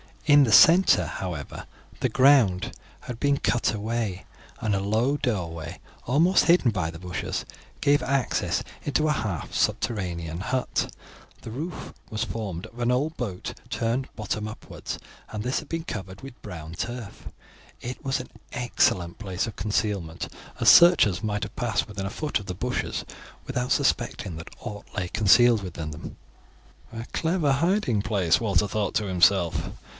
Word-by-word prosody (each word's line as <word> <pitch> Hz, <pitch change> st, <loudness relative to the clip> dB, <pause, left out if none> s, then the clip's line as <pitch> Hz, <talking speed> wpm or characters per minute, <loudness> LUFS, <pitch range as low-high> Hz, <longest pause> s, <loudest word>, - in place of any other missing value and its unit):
In 145 Hz, -2 st, +7 dB
the 115 Hz, -, 0 dB
centre, 165 Hz, -, +7 dB
however, 80 Hz, -3 st, -6 dB, 0.3 s
the -, -, +1 dB
ground 130 Hz, -9 st, +4 dB, 0.3 s
had 120 Hz, -2 st, -7 dB
been 140 Hz, -1 st, +2 dB
cut 120 Hz, -4 st, +1 dB
away, 105 Hz, -3 st, -3 dB, 0.3 s
and 110 Hz, -2 st, 0 dB
a 100 Hz, -, +1 dB
low 110 Hz, +8 st, +1 dB
doorway, 85 Hz, -, -3 dB, 0.3 s
almost 165 Hz, +9 st, +4 dB
hidden 170 Hz, -8 st, +5 dB
by 90 Hz, -6 st, -1 dB
the 80 Hz, -, -8 dB
bushes, 90 Hz, +1 st, -4 dB, 0.4 s
gave 145 Hz, +1 st, +4 dB
access 135 Hz, -1 st, 0 dB, 0.2 s
into 150 Hz, +2 st, +1 dB
a -, -, +3 dB
half 105 Hz, -, -3 dB
subterranean 85 Hz, -6 st, -1 dB
hut; 130 Hz, +6 st, -1 dB, 0.5 s
the 110 Hz, -, -8 dB
roof 155 Hz, +8 st, -6 dB, 0.2 s
was 110 Hz, -, -2 dB
formed 100 Hz, -6 st, -4 dB
of 120 Hz, -, -15 dB
an 120 Hz, 0 st, +2 dB
old 145 Hz, +6 st, 0 dB
boat 100 Hz, -8 st, -4 dB, 0.2 s
turned 120 Hz, +3 st, -1 dB
bottom 105 Hz, -1 st, -3 dB
upwards, 110 Hz, -, -7 dB, 0.3 s
and 105 Hz, -1 st, -5 dB
this 125 Hz, +2 st, 0 dB
had 155 Hz, -, -11 dB
been 165 Hz, +1 st, -3 dB
covered 95 Hz, -, -6 dB
with 135 Hz, -2 st, -11 dB
brown 85 Hz, -5 st, -8 dB
turf. 120 Hz, +3 st, -6 dB, 0.5 s
It 125 Hz, +5 st, -6 dB
was 135 Hz, -1 st, 0 dB
an 125 Hz, -, -8 dB, 0.2 s
excellent 95 Hz, -7 st, +1 dB
place 95 Hz, -1 st, -2 dB
of 110 Hz, -, -8 dB
concealment, 100 Hz, -5 st, -2 dB, 0.3 s
as -, -, +6 dB
searchers 170 Hz, -, +7 dB
might 105 Hz, -2 st, -2 dB
have 105 Hz, +3 st, -6 dB
passed 115 Hz, -9 st, 0 dB
within 100 Hz, -2 st, -5 dB
a -, -, -2 dB
foot 150 Hz, +1 st, -1 dB
of 105 Hz, -, -10 dB
the 90 Hz, -, -5 dB
bushes 125 Hz, +6 st, -2 dB, 0.4 s
without 125 Hz, -1 st, -2 dB
suspecting 120 Hz, -, 0 dB
that 80 Hz, -, -10 dB
aught 105 Hz, 0 st, -7 dB
lay 90 Hz, -3 st, -2 dB
concealed 110 Hz, +3 st, +5 dB
within 80 Hz, -4 st, -5 dB
them. 75 Hz, +2 st, -8 dB, 0.8 s
"A 115 Hz, 0 st, -5 dB
clever 160 Hz, -3 st, +1 dB
hiding 140 Hz, -, +2 dB
place," 100 Hz, -6 st, +2 dB
Walter 100 Hz, -3 st, +2 dB
thought 105 Hz, +1 st, -2 dB
to 105 Hz, -, +1 dB
himself. 90 Hz, -1 st, +3 dB
110 Hz, 160 wpm, -26 LUFS, 95-130 Hz, 0.8 s, In